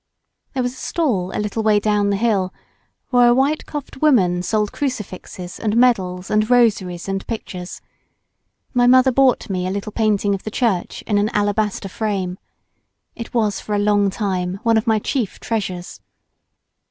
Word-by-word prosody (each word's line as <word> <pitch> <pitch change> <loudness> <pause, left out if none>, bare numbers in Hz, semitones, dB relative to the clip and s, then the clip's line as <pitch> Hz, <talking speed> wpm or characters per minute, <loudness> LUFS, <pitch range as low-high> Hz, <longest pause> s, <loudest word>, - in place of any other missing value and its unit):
There 255 - 0
was 245 0 -2
a - - -14
stall 235 - -1
a - - -4
little 210 +1 -2
way 215 -1 +3
clown 205 -1 +1
the 200 - +1
hill 195 -4 +1 0.6
where 245 -1 +5
a 240 - +5
white 280 +4 +1
coifed 290 -3 -7
woman 190 -13 +3
sold 210 +3 0
crucifixes 200 -9 -5
and 215 0 0
medals 190 -7 +2
and 215 +1 +2
rosaries 200 -8 +2
and 195 0 -3
pictures. 185 -5 -6 0.9
My 245 -1 +4
mother 255 +1 +6
bought 260 -1 +3
me 185 -2 -2
a - - -2
little 200 +2 -4
painting 210 -2 +1
of 195 - -3
the - - -5
church 215 -5 -1
in 205 -2 +1
an 210 +1 +1
alabaster 205 -1 0
frame. 190 -3 -3 0.8
It 230 +1 -8
was 215 -4 +1
for 210 - -3
a - - +1
long 205 -1 +3
time 190 -2 -2
one 230 -1 +3
of 220 0 +1
my 220 -1 +4
chief 220 -1 -2
treasures. 185 -6 -4
210 Hz, 170 wpm, -20 LUFS, 190-235 Hz, 0.9 s, mother